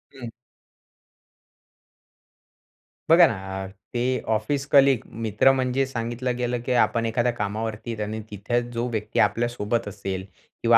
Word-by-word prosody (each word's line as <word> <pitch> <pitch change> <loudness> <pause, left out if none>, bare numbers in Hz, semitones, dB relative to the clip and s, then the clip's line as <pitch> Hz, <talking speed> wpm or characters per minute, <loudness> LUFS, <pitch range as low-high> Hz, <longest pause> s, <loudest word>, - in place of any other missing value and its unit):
हं. 120 -3 -7 2.8
बघा 170 +1 +8
ना 95 -3 -4
अ, - - -6 0.3
ते 125 +1 0
ऑफिस 135 +6 -1
कलीग 135 -3 +5 0.2
मित्र 110 +4 +4
म्हणजे 130 0 +1
सांगितलं 120 0 -3
गेलं, 125 0 -1
की - - -1
आपण 115 -1 +2
एखाद्या 120 +2 +1
कामावरती 110 +1 -3
आणि 110 +1 -3
तिथे 105 +4 -1
जो 120 +1 -2
व्यक्ती 110 -2 -2
आपल्यासोबत 115 +2 +1
असेल 95 -2 -5 0.4
किंवा 115 0 +7
115 Hz, 125 wpm, -24 LUFS, 105-125 Hz, 2.8 s, बघा